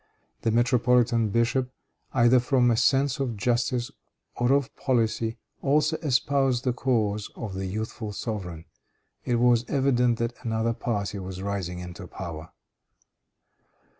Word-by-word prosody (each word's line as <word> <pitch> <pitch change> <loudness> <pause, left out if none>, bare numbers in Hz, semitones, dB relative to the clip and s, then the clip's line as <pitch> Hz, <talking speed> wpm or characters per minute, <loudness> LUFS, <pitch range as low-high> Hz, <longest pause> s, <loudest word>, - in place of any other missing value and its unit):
The - - +1
metropolitan 120 -1 +3
bishop, 120 +4 +1 0.4
either 120 0 +5
from 125 -1 +3
a - - +3
sense 135 +4 +2
of 125 -5 -2
justice 120 +2 0 0.4
or 120 +1 +1
of 140 0 +1
policy, 115 -2 0 0.2
also 150 +3 +2
espoused 135 -3 +1
the 125 - +1
cause 110 -5 0
of 110 -4 -6
the 95 0 -3
youthful 110 +2 -4
sovereign. 95 -7 -5 0.6
It 120 - +1
was 120 0 +4
evident 125 -4 +2
that 115 +1 -1
another 115 0 0
party 105 -3 -3
was 95 0 -6
rising 95 -3 -3
into 90 +1 -8
power. 85 -3 -7
120 Hz, 130 wpm, -26 LUFS, 105-125 Hz, 0.6 s, either